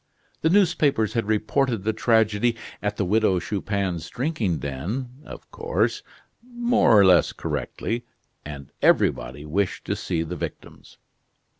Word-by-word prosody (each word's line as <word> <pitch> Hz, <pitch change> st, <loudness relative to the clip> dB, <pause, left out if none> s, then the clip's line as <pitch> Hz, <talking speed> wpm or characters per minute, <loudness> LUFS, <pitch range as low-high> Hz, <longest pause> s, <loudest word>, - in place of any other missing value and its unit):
The 160 Hz, -, +3 dB
newspapers 155 Hz, -, +3 dB
had 115 Hz, -3 st, -1 dB
reported 110 Hz, +1 st, 0 dB
the 110 Hz, +1 st, 0 dB
tragedy 110 Hz, 0 st, +2 dB, 0.3 s
at 105 Hz, 0 st, -2 dB
the 100 Hz, -, 0 dB
Widow 105 Hz, 0 st, +2 dB
Chupin's 95 Hz, -2 st, -3 dB
drinking 125 Hz, -, -1 dB
den, 75 Hz, -, -4 dB, 0.2 s
of -, -, -11 dB
course, 465 Hz, +2 st, -1 dB, 0.4 s
more 240 Hz, -, +3 dB
or 100 Hz, -, +7 dB
less 90 Hz, -2 st, +5 dB
correctly, 120 Hz, +1 st, -4 dB, 0.4 s
and 70 Hz, -2 st, -9 dB
everybody 75 Hz, -, +2 dB
wished 90 Hz, +5 st, -1 dB
to -, -, -1 dB
see 80 Hz, -1 st, -2 dB
the 85 Hz, +2 st, -5 dB
victims. -, -, -8 dB
110 Hz, 130 wpm, -24 LUFS, 90-130 Hz, 0.4 s, or